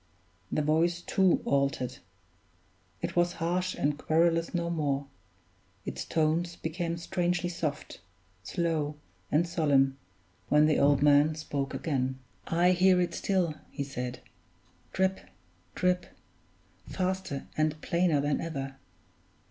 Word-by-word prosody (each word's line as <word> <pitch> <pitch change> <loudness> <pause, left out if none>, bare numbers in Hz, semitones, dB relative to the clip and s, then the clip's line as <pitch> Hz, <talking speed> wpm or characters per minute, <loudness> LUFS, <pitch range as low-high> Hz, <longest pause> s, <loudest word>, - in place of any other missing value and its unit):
The 150 - +1
voice, 165 +3 +2
too, 185 +1 +2
altered; 140 -3 0 1.0
it 170 0 -2
was 175 0 +3
harsh 180 +2 -1
and 145 +1 0
querulous 165 +1 +2
no 170 -1 -1
more; 145 -4 0 0.8
its - - -4
tones 165 +2 0
became 170 +1 -3
strangely 175 0 -1
soft, 160 -4 -4 0.4
slow, 155 - -1 0.4
and 165 +4 +3
solemn, 140 -5 +2 0.5
when 150 +1 +5
the 155 -1 +3
old 140 0 +4
man 150 +1 +5
spoke 140 -3 -3
again. 130 -2 -1 0.3
"I 175 +2 +3
hear 185 0 +4
it 175 - 0
still," 185 -5 0 0.2
he 140 - -4
said, 125 -2 -5 0.7
"drip! 190 0 +1 0.6
drip! 180 0 +1 0.8
faster 185 -6 -2
and 155 0 0
plainer 170 -3 +2
than 145 0 0
ever. 135 -4 -5
160 Hz, 115 wpm, -29 LUFS, 145-175 Hz, 1.0 s, when